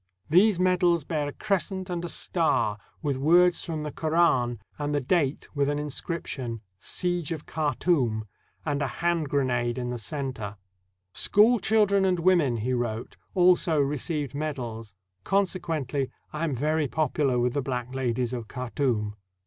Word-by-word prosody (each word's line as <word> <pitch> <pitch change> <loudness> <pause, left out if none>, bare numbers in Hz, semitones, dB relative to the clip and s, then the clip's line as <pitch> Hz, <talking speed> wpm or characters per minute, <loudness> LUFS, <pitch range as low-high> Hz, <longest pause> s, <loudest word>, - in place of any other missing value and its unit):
These 185 +2 +5
medals 180 -3 +3
bear 150 -1 -2
a - - -3
crescent 190 0 -2
and 175 -2 -3
a 175 - -3
star, 160 - +1 0.2
with 140 -3 0
words 175 +5 +4
from 160 -3 -4
the 150 - -4
Koran, 155 -8 +2 0.2
and 145 0 -1
the - - +2
date, 145 0 0
with 145 -1 +1
an 145 - 0
inscription, 140 -5 -4
— - - -48
"Siege 175 - -1
of 160 -3 -4
Khartoum," 145 -7 0 0.2
— - - -37
and 145 -2 -1
a 140 - +1
hand 170 +2 -1
grenade 125 -3 0
in 125 -1 -2
the 120 - -4
center. 115 -5 -4 0.6
"School 225 +4 +4
children 200 -1 +3
and 185 -1 +2
wo 185 +2 +5
men," 135 -9 +1
he 120 +4 -1
wrote, 120 -2 -3 0.2
"also 175 -3 +4
received 145 0 -1
medals; 120 -9 -5 0.3
consequently, 165 - 0 0.2
I 155 +2 -1
am 150 -5 -1
very 150 +3 +1
popular 145 -3 +1
with 120 0 +1
the 145 - 0
black 125 -1 -4
ladies 125 -2 -1
of 120 -3 -4
Khartoum." 120 -4 -1
145 Hz, 160 wpm, -27 LUFS, 125-170 Hz, 0.6 s, These